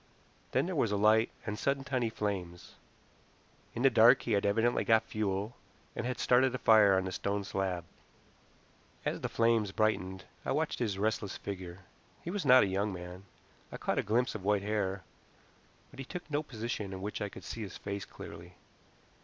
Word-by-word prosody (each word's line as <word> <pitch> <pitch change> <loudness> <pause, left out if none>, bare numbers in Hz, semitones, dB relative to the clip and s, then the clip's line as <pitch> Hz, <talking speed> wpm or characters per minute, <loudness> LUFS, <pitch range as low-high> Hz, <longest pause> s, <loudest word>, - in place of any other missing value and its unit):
Then - - +2
there 185 0 -3
was 115 -8 +1
a 105 - +1
light 110 +3 +4 0.2
and 105 -1 -4
sudden 140 0 0
tiny 130 -4 -1
flames. 95 -5 -4 1.0
In 120 - -2
the 135 - +7
dark 115 0 +6
he 120 - -3
had 100 -1 +2
evidently 115 +4 +2
got 110 0 +4
fuel, 105 0 -2 0.4
and 120 - -3
had 125 - -2
started 130 +1 +3
a - - -1
fire 105 -4 +6
on 95 - +1
the 95 - -3
stone 100 +2 -2
slab. 95 -3 -2 1.2
As - - -2
the - - -2
flames 115 -3 +2
brightened 95 -3 -1 0.2
I - - -1
watched 160 0 -1
his 105 -6 -1
restless 105 -1 -1
figure. 95 -2 -7 0.4
He 170 - -4
was 190 -7 -2
not 130 0 +8
a - - +3
young 100 +2 -1
man. 90 +1 -8 0.5
I - - -6
caught - - -1
a - - +3
glimpse 120 +5 +1
of 110 - -6
white 100 0 +2
hair, 100 -2 -1 0.9
but - - -14
he 135 - -5
took 175 0 -8
no 145 +1 +1
position 115 -7 -5
in 95 - -6
which 105 - -4
I 105 - -2
could 95 - -11
see 110 +6 -6
his 100 - -6
face 100 0 -5
clearly. 85 +2 -11
105 Hz, 190 wpm, -32 LUFS, 95-120 Hz, 1.2 s, not